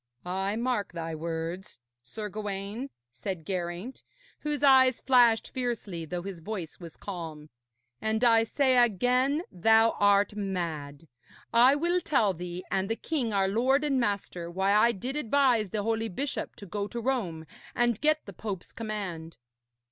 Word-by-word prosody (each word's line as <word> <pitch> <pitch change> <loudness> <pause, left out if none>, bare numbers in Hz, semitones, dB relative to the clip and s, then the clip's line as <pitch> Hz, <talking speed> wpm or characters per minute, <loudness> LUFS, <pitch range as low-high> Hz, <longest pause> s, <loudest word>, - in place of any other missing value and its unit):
'I 190 +3 -1
mark 235 -5 -1
thy 165 -1 -4
words, 165 +4 -5 0.2
Sir 210 - -6
Gawaine,' 205 +4 -5 0.2
said 165 +5 -5
Geraint, 180 +6 -4 0.4
whose 295 -1 -3
eyes 260 -2 +6
flashed 240 -4 +4
fiercely, 225 -9 -3
though 175 +2 -4
his 195 -3 -6
voice 180 -2 -6
was 170 -3 -11
calm, 160 -6 -7 0.5
'and 220 +2 0
I 230 -2 +6
say 260 +2 +3
again 250 - +2
thou 225 +5 +4
art 205 0 +4
mad. 165 -7 -4 0.5
I 245 +4 +6
will 345 +4 +1
tell 220 - +2
thee 175 +1 -6
and 190 0 0
the 225 - 0
king, 260 -4 -2
our 195 -2 +2
lord 255 +8 +2
and 280 -3 +1
master, 200 -6 -2
why 190 +3 +1
I 215 +3 +5
did 245 +6 -5
advise 255 -6 +2
the 205 +2 -2
holy 225 +1 -1
bishop 275 +9 -4
to 200 - -10
go 200 +2 -3
to 235 - -5
Rome 220 -11 -2 0.3
and 240 -3 +1
get 310 0 +2
the 200 - -9
Pope's 195 -1 -6
command. 195 -7 -5
210 Hz, 155 wpm, -28 LUFS, 180-245 Hz, 0.5 s, eyes